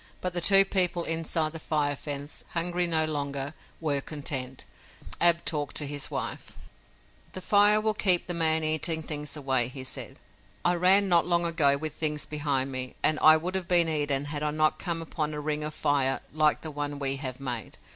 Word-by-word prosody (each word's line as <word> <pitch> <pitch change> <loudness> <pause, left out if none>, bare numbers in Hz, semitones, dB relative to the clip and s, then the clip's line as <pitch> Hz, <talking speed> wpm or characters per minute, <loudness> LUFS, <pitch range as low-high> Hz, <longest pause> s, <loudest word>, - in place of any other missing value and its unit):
But 180 -1 -2
the 175 - 0
two 195 +2 +8
people 180 -3 +2
inside 165 -1 -1
the 160 - -6
fire 145 -2 -2
fence, 145 +1 -4
hungry 175 +1 0
no 160 -2 +2
longer, 140 -2 -4 0.3
were 145 -4 -1
content. 135 -3 -4 0.5
Ab 170 0 +4
talked 150 -3 -3
to 150 - 0
his 145 0 -1
wife: - - -6 0.8
"The - - -5
fire 205 +2 +4
will 215 0 0
keep 185 -4 +2
the 175 - -4
man 160 -1 +1
eating 155 +1 +1
things 150 -1 -5
away," 130 -4 +1
he 130 +1 -8
said. 130 - -5 0.5
"I 175 - +3
ran 185 +3 +5
not 175 -2 +2
long 175 -1 +2
ago 155 -5 +2
with 155 0 -4
things 150 -1 -1
behind 140 -3 -2
me, 130 -1 -5
and 155 - +5
I 155 0 +7
would 175 +4 -5
have 190 -2 -3
been 175 -3 +4
eaten 145 -3 -1
had 145 0 -5
I 150 - -1
not 155 +1 0
come 170 -3 -2
upon 155 -2 -4
a - - -5
ring 150 0 -3
of 150 - -4
fire 135 -2 0
like 155 -1 +1
the 160 - -6
one 145 0 -5
we 135 -1 -2
have 130 -2 -6
made. 125 -4 -5
155 Hz, 195 wpm, -26 LUFS, 145-170 Hz, 0.8 s, two